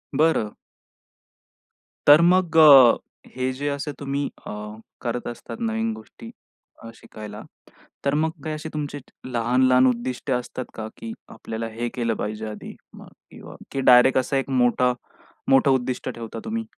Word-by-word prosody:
बरं. 150 -8 +2 1.6
तर 145 +2 +9
मग, 175 -1 +3
अ, 140 -6 +8 0.4
हे 130 0 -1
जे 140 +3 -4
असे 140 +1 -3
तुम्ही 140 0 -2 0.2
अ, - - -5 0.5
करत 120 0 -3
असतात 120 - -8
नवीन 225 -1 -1
गोष्टी 230 +1 -12 0.5
अ, 115 - -8
शिकायला, 105 -2 -10 0.6
तर 140 - +2
मग 160 +2 +1
काही 155 - -3
अशी 155 +1 -7
तुमची 145 -1 -4 0.3
लहान-लहान 125 +1 +3
उद्दिष्ट 125 +2 -2
असतात 125 0 -3
का, 110 -1 -6
की 115 0 -7 0.2
आपल्याला 110 0 -6
हे 120 +2 -4
केलं 115 -2 0
पाहिजे 110 +1 -4
आधी 105 - -9 0.2
मग - - -12 0.2
किंवा - - -12 0.2
की 135 - -2
डायरेक्ट 125 +2 +6
असं 135 +2 -1
एक 135 - -2
मोठं, 125 -1 +2 0.6
मोठं 135 +1 +5
उद्दिष्ट 130 -1 -1
ठेवता 115 -1 -8
तुम्ही? 225 0 -3
130 Hz, 145 wpm, -23 LUFS, 120-145 Hz, 1.6 s, तर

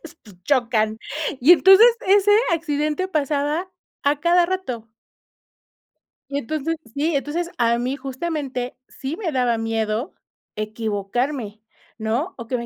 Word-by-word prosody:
Pues, 330 0 -12 0.3
chocan 230 -5 +1 0.4
y 285 +8 +8
entonces 385 +6 +8 0.2
ese 405 +1 +5 0.2
accidente 305 +2 -1
pasaba 300 +2 -1 0.3
a 285 +1 +1
cada 345 +2 +4
rato. 255 -12 -4 1.4
Y 280 - -1
entonces 310 +4 -2 0.2
sí, 300 +3 0
entonces, 320 +5 -2
a 235 -1 +2
mí 250 +3 -2
justamente 270 -3 -4
sí 275 +3 -5
me 350 -4 -3
daba 245 -3 +1
miedo 225 +2 -2 0.4
equivocarme, 215 +2 -3 0.4
¿no? 235 +12 -2
O 235 -2 -8
que 250 - -1
me 235 - -5
280 Hz, 125 wpm, -22 LUFS, 235-330 Hz, 1.4 s, y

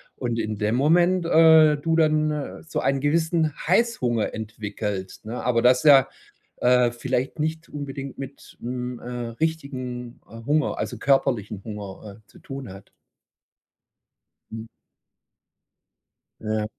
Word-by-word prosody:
und 120 -2 -3
in 110 -2 -3
dem 105 +2 +1
Moment, 175 +5 +3
äh, 160 -2 +6
du 165 +2 0
dann 155 -2 0
so 160 - -3
einen 135 -1 0
gewissen 160 +1 +1 0.2
Heißhunger 180 - +1
entwickelst, 105 -2 -5
ne, 115 +3 -5
aber 120 -2 +2
das 125 0 +5
ja, 135 -3 +7 0.5
äh, 125 -1 +3
vielleicht 130 +4 -3
nicht 160 +2 -3
unbedingt 140 -2 -7
mit, 135 0 -10
hm, 125 0 -4
äh, 125 - -9 0.3
richtigen, 130 -6 -4
äh, 115 0 -11
Hunger, 150 +1 +1
also, - - -3
körperlichen 120 -7 +1
Hunger, 105 -1 -8
äh, - - -49
zu - - -19
tun 135 -7 -8
hat? 95 0 -14 1.6
Mhm. 110 0 -7 1.8
Ja. 110 0 -1
130 Hz, 125 wpm, -24 LUFS, 115-155 Hz, 1.8 s, ja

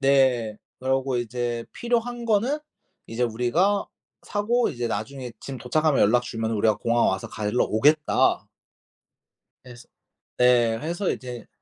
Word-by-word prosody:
네. 130 -6 +3 0.2
그러고 130 0 0
이제 120 0 -2
"필요한 240 0 -2
거는 230 +7 +1 0.5
이제 115 +2 -3
우리가 125 - +1 0.4
사고 230 +4 0
이제 120 -4 -3
나중에 125 +4 -4
짐 135 -2 -7
도착하면 150 +5 +1
연락 120 +4 +4
주면은 115 -2 -3
우리가 110 0 +2
공항 120 0 +2
와서 95 0 -1
가지러 105 +3 0
오겠다." 150 +7 +2 1.2
해서 120 -1 -13 0.5
네. 120 -2 +4
해서 175 - -2
이제 125 -2 -7
125 Hz, 275 characters per minute, -25 LUFS, 115-155 Hz, 1.2 s, 연락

